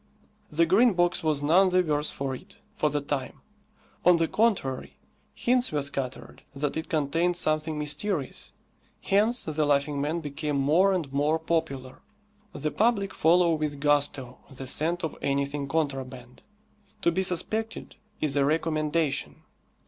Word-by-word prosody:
The 165 +2 +2
Green 210 +7 +4
Box 175 0 +1
was 150 -2 +1
none 180 +6 +5
the 185 0 +3
worse 150 -2 0
for 135 -1 -4
it, 190 +10 -11 0.2
for 155 -8 +1
the 145 0 -1
time. 140 -2 -4 0.6
On 180 -1 +6
the 165 0 +1
contrary, 195 - 0 0.4
hints 250 +1 +1
were 145 -2 0
scattered 135 -2 -5
that 145 +1 -2
it 160 - -4
contained 165 +4 +1
something 155 -2 0
mysterious. 150 +1 -2 0.5
Hence 215 +5 +2
the 155 -1 -1
Laughing 145 0 +1
Man 155 +4 -1
became 150 -1 -3
more 160 +8 +3
and 165 -8 -2
more 145 +3 +2
popular. 160 -6 -3 0.5
The 155 -6 -3
public 210 -3 +1
follow 170 +1 +4
with 150 -2 -2
gusto 145 -3 +1
the 135 -1 -8
scent 165 +7 0
of 160 - -3
anything 140 0 -1
contraband. 135 -4 -3 0.6
To 170 - +4
be 185 - 0
suspected 215 +5 -2 0.3
is 145 -2 0
a 140 - +3
recommendation. 155 0 0
155 Hz, 145 wpm, -27 LUFS, 140-175 Hz, 0.6 s, On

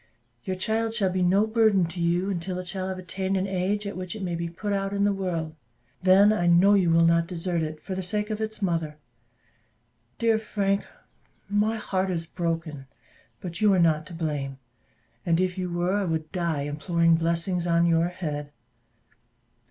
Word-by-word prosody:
Your 185 - -2
child 220 +4 -1
shall 195 -5 +1
be 185 0 -1
no 190 +4 +4
burthen 220 -4 +3
to 175 +1 -8
you 175 +3 +1
until 180 0 -3
it 185 - -5
shall 185 +1 -3
have 190 - -4
attained 190 +1 -2
an 190 - 0
age 195 +2 -1
at 200 - -4
which 185 +2 -5
it 210 - -6
may 175 -2 -2
be 170 0 -3
put 200 +4 -4
out 195 0 -1
in 200 0 +1
the 205 0 +3
world: 170 -5 -3 0.5
then, 195 +3 +6
I 175 -5 0
know 175 +4 +6
you 190 -4 +3
will 165 0 +5
not 170 0 +3
desert 175 -1 -2
it 155 0 -4
for 190 - -6
the 190 - -2
sake 210 +4 -3
of 215 0 -3
its 220 -1 -4
mother. 165 -4 -1 1.2
Dear 225 -1 +2
Frank, 200 -2 -1 0.6
my 210 +2 +1
heart 190 -3 -1
is 165 -2 -2
broken; 165 -5 -4 0.5
but 175 0 -6
you 210 -1 +5
are - - +2
not 155 -2 +2
to 170 - -9
blame; 145 -5 -3 0.7
and 165 -1 +2
if 185 -1 0
you 185 -1 -3
were, 175 +2 0
I 205 -1 +1
would 160 -2 -2
die 170 -5 -1
imploring 165 +3 +1
blessings 170 +2 0
on 170 0 +3
your 165 0 +3
head." 150 -5 -5
180 Hz, 190 wpm, -26 LUFS, 165-195 Hz, 1.2 s, then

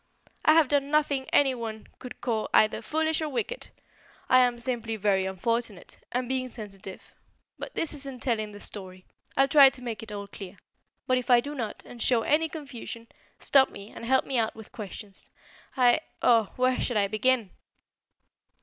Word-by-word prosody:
"I 310 - +6
have 320 -2 +5
done 280 0 +1
nothing 290 -3 +1
anyone 235 -6 +1
could 250 - -10
call 225 -3 -1
either 215 - +4
foolish 315 +1 0
or 310 - -2
wicked. 475 - -4 0.6
I 255 - +7
am 245 -1 +3
simply 235 -2 -2
very 195 -2 +1
unfortunate, 210 +1 -3
and 250 0 -1
being 260 0 -1
sensitive 200 -5 -10 0.5
But - - -7
this 325 - 0
isn't 275 -3 -6
telling 215 -4 -1
the 205 - -11
story. 185 -3 -9 0.3
I'll 270 - +5
try 280 -1 +8
to 265 - -10
make 230 -3 -4
it 220 -1 -9
all 200 -1 -5
clear; 200 -1 -10 0.5
but 255 0 +2
if 245 - -8
I 245 -1 +7
do 285 +5 -5
not, 230 -7 -5
and 240 - -11
show 235 -2 +3
any 320 +5 +2
confusion, 250 -6 -8 0.3
stop 270 -1 +4
me 200 +2 -11
and - - -10
help 260 +3 +2
me 265 -3 0
out 220 -1 0
with 220 -1 -12
questions. 205 -2 -8 0.5
I 250 -1 +5
I - - +1 0.2
oh, 230 -4 +4
where 255 0 +2
shall 245 - -1
I 205 - +3
begin?" 215 0 +1
240 Hz, 180 wpm, -27 LUFS, 215-265 Hz, 0.6 s, try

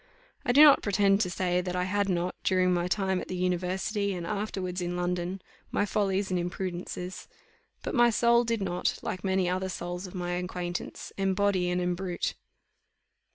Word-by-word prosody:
I - - +2
do 285 +5 +8
not 290 -2 +8
pretend 200 0 +3
to 180 - +1
say 180 0 0
that 180 0 -4
I 180 - +1
had 200 +2 0
not, 180 0 0
during 185 -1 +3
my 175 0 0
time 190 0 0
at - - -8
the 185 - -4
university, 185 +3 -1
and 175 -1 -5
afterwards 190 -2 -3
in 175 0 -2
London, 180 +1 -2 0.3
my 205 - +1
follies 195 -1 0
and 180 - +1
imprudences; 180 0 -4 0.6
but - - -3
my 240 -2 +5
soul 235 +1 +4
did 230 -3 -1
not, 180 -1 -1
like 185 - -4
many 190 -1 +1
other 185 +1 -1
souls 175 +1 -5
of 185 - -11
my 175 -1 -2
acquaintance, 180 0 -4
"embody 195 -1 +2
and 180 0 0
embrute." 180 0 -1
185 Hz, 175 wpm, -28 LUFS, 180-200 Hz, 0.6 s, do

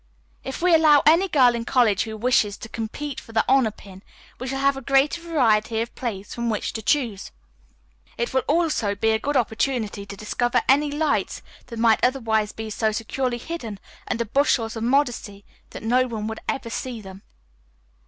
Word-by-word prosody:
"If 265 +5 -6
we 360 -1 +4
allow 310 -3 +6
any 335 +6 +5
girl 255 -8 +4
in 235 -1 -3
college 230 -5 +2
who 220 -1 -6
wishes 215 -3 +2
to 225 - -9
compete 250 +6 -5
for 225 - -14
the 220 - +2
honor 260 -3 +4
pin 195 -3 -14 0.4
we 255 - -5
shall 270 +1 -3
have 275 0 +2
a 270 - -6
greater 275 +5 +2
variety 230 -9 +1
of 230 +1 -3
plays 205 -5 -5
from 235 0 -2
which 215 - -2
to 220 - -4
choose. 225 -5 0 0.9
It 235 - -2
will 260 - +3
also 300 -10 +1
be 220 +2 +1
a 220 - +1
good 285 +4 0
opportunity 220 -3 -1
to 200 - -8
discover 240 +4 0
any 290 +3 +4
lights 295 +1 -1 0.2
that 230 - -8
might 225 -1 +3
otherwise 225 -5 +1
be 220 0 -7
so 220 +1 0
securely 240 +3 -2
hidden 235 -7 -6 0.3
under 235 0 -1
bushels 230 -2 +1
of 225 - -4
modesty 240 -6 0 0.2
that - - -9
no 250 +3 +2
one 220 -3 -4
would 220 0 -4
ever 230 -4 -3
see 245 0 -4
them. 190 -2 -11
235 Hz, 185 wpm, -23 LUFS, 220-270 Hz, 0.9 s, allow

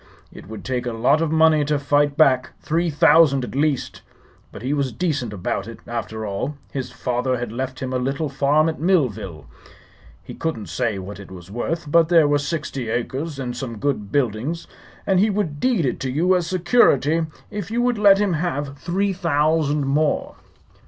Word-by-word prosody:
It - - -12
would 110 0 -9
take 125 -1 -2
a 120 - -2
lot 125 +7 +2
of 165 -2 0
money 160 -1 +4
to 150 0 +1
fight 145 0 +1
back 130 -5 +3
three 170 +2 0
thousand, 150 -3 +5
at - - -6
least. 145 0 -1 0.5
But - - -10
he 135 +3 -1
was 140 -3 0
decent 140 -2 -2
about 100 0 -3
it, 115 - -8
after 110 -2 -5
all. 105 +9 -3 0.2
His 130 -3 -4
father 125 0 -1
had 120 -2 -4
left 130 +2 -5
him 130 0 -3
a 130 - 0
little 140 +5 -1
farm 145 +3 +2
at 160 - -3
Millville. 110 - 0 0.8
He - - -9
couldn't 155 -11 -4
say 115 -5 -1
what 100 +2 -8
it 100 - -11
was 90 0 -11
worth, 165 +9 -3
but 165 0 +4
there 165 -4 +5
were 145 0 +2
sixty 145 -5 -4
acres 135 +6 -3
and 125 -2 -4
some 120 -3 -5
good 105 -5 -2
buildings, 140 +5 -1 0.4
and 190 -2 +2
he 210 +3 +3
would 195 -8 -2
deed 230 - +1
it 125 - -1
to 130 - -3
you 170 +8 +2
as 175 -2 0
security 165 - +3 0.2
if 205 -2 -5
you 240 +2 0
would 245 -3 +1
let 200 -2 +7
him 200 -2 +1
have 145 -4 -3
three 195 +3 -1
thousand 155 -4 +1
more." 145 +3 0
145 Hz, 190 wpm, -22 LUFS, 125-165 Hz, 0.8 s, let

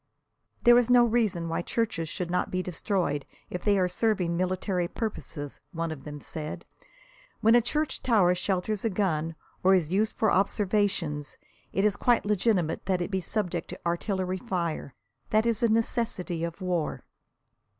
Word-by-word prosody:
"There 240 0 +8
is 245 -1 0
no 245 -1 +7
reason 215 -8 +1
why 165 - -1
churches 175 -6 -1
should 175 -1 -4
not 180 0 0
be 185 0 -1
destroyed 180 -5 -1 0.3
if 180 - -4
they 205 -1 +3
are 185 -1 +3
serving 180 -2 0
military 185 0 0
purposes," 170 - -5
one 165 -1 -2
of 135 -4 -8
them 150 -1 -6
said. 155 +1 -6 0.8
"When 225 +1 +5
a 240 - +7
church 300 +6 -1
tower 205 -8 +4
shelters 190 +3 -1
a 225 - +2
gun, 165 -5 0 0.3
or 190 +1 +6
is 170 -3 0
used 215 +3 +1
for 220 - +3
observations, 190 -6 0 0.3
it 195 - +1
is 210 -1 +3
quite 240 -4 +2
legitimate 200 -6 +1
that 185 -2 +2
it 175 - -3
be 190 -1 0
subject 180 -3 -2
to - - -8
artillery 185 +1 -1
fire. 170 - -3 0.3
That 215 +1 +3
is 230 -2 +1
a 235 - +4
necessity 220 -6 0
of 170 +2 -4
war." 180 -4 -1
185 Hz, 165 wpm, -28 LUFS, 170-215 Hz, 0.8 s, There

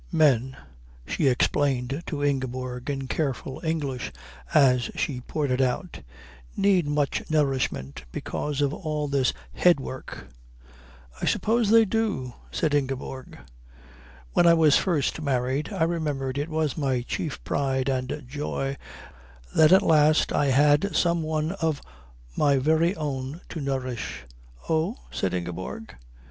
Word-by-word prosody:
"Men," 135 -5 +3 0.5
she 145 - 0
explained 135 +2 +1
to 145 -3 -3
Ingeborg 130 -2 -2
in 135 -2 -3
careful 135 -2 -3
English 145 -6 -2 0.4
as 125 -3 +4
she 130 -4 -2
poured 145 +2 -2
it 125 +1 +2
out, 135 +8 -1 0.6
"need 190 -5 +3
much 145 -1 0
nourishment 130 - -1
because 145 - -3
of 145 0 +1
all 155 -4 -3
this 140 -3 +2 0.2
head 175 -4 +4
work." 130 - -8 0.9
"I - - -1
suppose 225 -1 +2
they 225 0 +7
do," 205 - -1 0.2
said 150 - -1
Ingeborg. 135 -2 -3 1.0
"When 175 - +5
I 170 - +7
was 155 -3 +5
first 160 -4 +1
married 135 0 -1
I - - 0
remember 150 -5 -1
it 145 +4 -3
was 155 -3 -1
my 130 -4 0
chief 150 +3 -4
pride 135 -2 0
and 130 +2 -2
joy 140 0 -3 0.8
that 155 +1 +6
at 190 +2 +7
last 155 -2 +4
I 145 - +2
had 145 +7 +3
some 170 -1 +2
one 155 0 -1
of 160 -3 +1 0.6
my 140 -2 +3
very 160 +6 +2
own 140 +1 -4
to 160 - -5
nourish." 130 - -3 0.4
"Oh?" 165 +8 0
said 95 -1 -1
Ingeborg. 90 - -5
145 Hz, 130 wpm, -26 LUFS, 130-160 Hz, 1.0 s, they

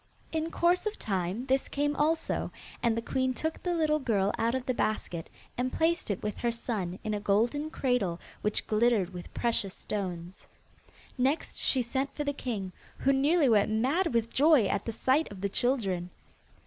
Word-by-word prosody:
In 320 0 -1
course 350 +4 +2
of 425 - -3
time, 190 +3 -2
this 265 0 +1
came 290 +1 0
also, 315 +2 0 0.3
and 230 -1 +2
the 230 - -2
queen 260 +1 0
took 315 +4 -3
the 355 -1 0
little 305 -2 +2
girl 205 -7 +1
out 230 +2 +1
of 260 -1 -2
the 255 - +1
basket, 180 -8 -2 0.3
and 255 +1 0
placed 330 -3 +1
it 200 - -2
with 210 -1 -2
her 235 - 0
son 210 -6 -3
in 215 - -2
a 210 - -1
golden 235 +9 +1
cradle 245 - 0 0.2
which 210 - 0
glittered 215 -4 +2
with 175 -1 -8
precious 215 -5 0
stones. 180 -3 -5 0.7
Next 270 +5 0
she 260 -2 +1
sent 265 +4 -2
for 295 - -2
the 285 0 -1
king, 210 -9 -4 0.3
who 275 - +3
nearly 290 +3 +4
went 215 -4 +4
mad 270 - +1
with 230 -1 0
joy 295 -5 +5
at 195 - -1
the 230 - -2
sight 260 +6 +1
of 195 -2 -9
the 200 - 0
children. 195 -7 0
240 Hz, 185 wpm, -29 LUFS, 205-285 Hz, 0.7 s, joy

